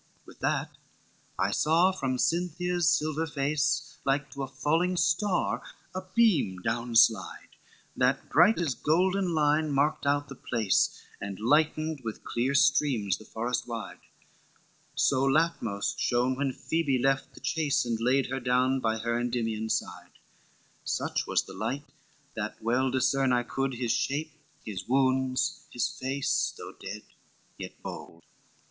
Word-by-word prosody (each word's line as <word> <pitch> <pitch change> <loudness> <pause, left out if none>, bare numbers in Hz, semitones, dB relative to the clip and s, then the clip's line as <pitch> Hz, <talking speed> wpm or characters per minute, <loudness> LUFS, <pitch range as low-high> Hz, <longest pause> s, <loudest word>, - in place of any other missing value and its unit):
XXXII - - -36
"With - - -15
that - - -1 0.6
I - - +1
saw 170 +5 +3
from 135 -8 -2
Cynthia's 175 +2 +1
silver 155 +1 0
face, 145 0 -1
Like 140 +1 0
to 140 - -6
a 135 - -2
falling 160 +7 0
star 180 +3 +1 0.3
a 185 - -3
beam 170 - +3
down 115 +1 -2
slide, 110 -4 +3 0.5
That 130 +2 +1
bright 175 +8 +5
as 165 -6 0
golden 180 +5 +1
line 150 0 +2
marked 140 +1 +1
out 145 0 +1
the 135 - -8
place, 115 -5 0 0.2
And 100 -1 -5
lightened 155 +4 +1
with 110 -2 -6
clear 130 +4 -1
streams 135 -8 +3
the 110 - -13
forest 120 +3 -3
wide; 110 -6 -6 1.0
So 130 -1 +2
Latmos 135 -9 +1
shone 125 +1 +1
when 135 0 -1
Phoebe 155 -4 0
left 135 +2 0
the - - -11
chase, 145 -5 0
And 115 -2 -1
laid 130 +3 +3
her 135 - -1
down 130 +1 +2
by 110 -2 0
her 115 +1 -1
Endymion's 115 -2 -1
side, - - -9 0.7
Such - - -2
was - - +2
the - - -11
light 145 +3 -3 0.5
that - - -4
well 125 +4 +1
discern 130 +1 +2
I 120 -1 +2
could, 135 +1 -2
His 120 -1 -1
shape, 150 +3 -1 0.3
his 95 -4 -6
wounds, 130 0 +1
his 120 0 0
face, 135 +1 -1
though - - -9
dead, 105 +2 -8 0.6
yet - - -8
bold. 85 0 -8
135 Hz, 145 wpm, -28 LUFS, 120-155 Hz, 1.0 s, bright